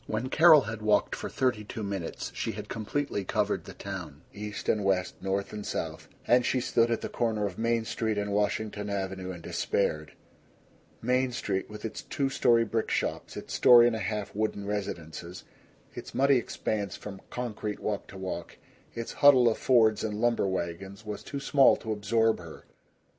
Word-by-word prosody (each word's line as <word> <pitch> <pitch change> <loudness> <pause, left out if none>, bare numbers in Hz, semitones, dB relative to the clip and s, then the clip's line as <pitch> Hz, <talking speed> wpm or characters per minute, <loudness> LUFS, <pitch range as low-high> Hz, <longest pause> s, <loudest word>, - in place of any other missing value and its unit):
II - - -6
When 120 +4 -1
Carol 155 0 +7
had 115 -3 -6
walked 105 -1 +2
for - - -5
thirty 125 -5 0
two 105 +1 -6
minutes 100 -4 -4
she - - -3
had - - -7
completely 115 0 -2
covered - - -1
the - - -10
town, 85 -6 -7
east 105 +1 -6
and 105 - +2
west, 95 -2 +1
north 95 +2 -2
and 105 -1 -5
south; - - -4 0.2
and 125 +1 +4
she 130 - +1
stood 120 -1 +2
at 115 - 0
the - - -3
corner 110 -3 -1
of 95 -1 -5
Main 115 0 +1
Street 110 -1 -1
and 105 0 -1
Washington 105 0 -1
Avenue 95 -2 -3
and 85 -2 -9
despaired. 75 -6 -1 0.9
Main 125 +2 +2
Street 95 -5 -2
with 105 +1 -8
its 110 - -5
two 135 -1 -1
story 115 -3 +4
brick 110 0 -1
shops, - - -2
its - - -7
story 120 -1 +8
and 120 -1 +2
a - - -3
half 105 -2 -3
wooden 105 -1 -2
residences, 90 -4 -5 0.5
its - - -9
muddy 140 0 +5
expanse 105 -4 -2
from 100 -2 -9
concrete 110 -4 -4
walk 105 -2 -3
to 95 - -11
walk, 90 -3 -5 0.4
its 115 0 -5
huddle 135 -4 +8
of 115 - +1
Fords 110 -4 +4
and 105 -1 -2
lumber 120 -3 +2
wagons, 95 +3 -4
was 105 -1 -5
too 140 - -6
small 140 -1 +5
to 110 - -6
absorb 110 +2 +2
her. 85 -2 -11
105 Hz, 185 wpm, -29 LUFS, 100-115 Hz, 0.9 s, story